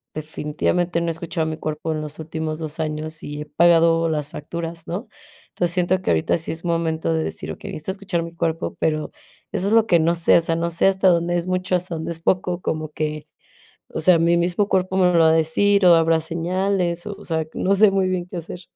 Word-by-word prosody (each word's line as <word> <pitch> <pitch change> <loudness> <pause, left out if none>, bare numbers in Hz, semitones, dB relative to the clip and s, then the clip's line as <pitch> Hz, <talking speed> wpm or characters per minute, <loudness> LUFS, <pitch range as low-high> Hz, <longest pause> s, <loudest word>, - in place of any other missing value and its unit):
definitivamente 155 +3 -1
no 170 - -2
he - - +1
escuchado 165 0 -3
a - - -2
mi 155 - -4
cuerpo 155 0 -3
en 155 - -3
los 150 -1 -7
últimos 160 0 -4
2 155 0 -6
años 155 0 -3
y 145 0 -6
he - - -6
pagado 165 +1 +4
las 150 -2 -2
facturas, 165 +2 -6
¿no? 190 +8 -5 0.4
Entonces, 175 -1 -1
siento 180 +1 +1
que - - -3
ahorita 80 - +1
sí 165 - -4
es 165 +2 -7
momento 165 -1 0
de 160 0 0
decir: - - -5
"Okey, - - -8
necesito 155 +5 -4
escuchar 190 -3 -3
mi 170 0 -8
cuerpo". 165 0 -2
Pero 155 -1 -1 0.4
eso 190 - -1
es 210 - +1
lo 225 -1 +5
que 175 -5 +4
no 165 +2 +2
sé, 170 0 +4
o - - +3
sea, 165 0 0
no 170 +1 -1
sé, 170 - +3
¿hasta 190 0 +3
dónde 175 0 +2
es 170 - -2
mucho, 185 0 0
hasta 180 -1 -3
dónde 160 +1 -4
es 165 - -6
poco? 180 +1 0
Como 155 -2 -3
que, 155 0 -4 0.6
o - - -5
sea, 170 +1 +5
¿mi 170 +1 +3
mismo 175 +4 0
cuerpo 185 0 +1
me 180 -1 +4
lo 170 - +4
va 160 -1 +6
a - - +4
decir, 185 +5 +3
o 175 -1 +8
habrá 165 0 +3
señales? 175 +2 -1
O 205 - -8
sea, 160 -1 -1
no 195 - +1
sé 205 0 +5
muy 195 -1 +1
bien 180 -1 -2
qué 180 - -7
hacer. 175 +1 -7
170 Hz, 235 wpm, -22 LUFS, 160-180 Hz, 0.6 s, o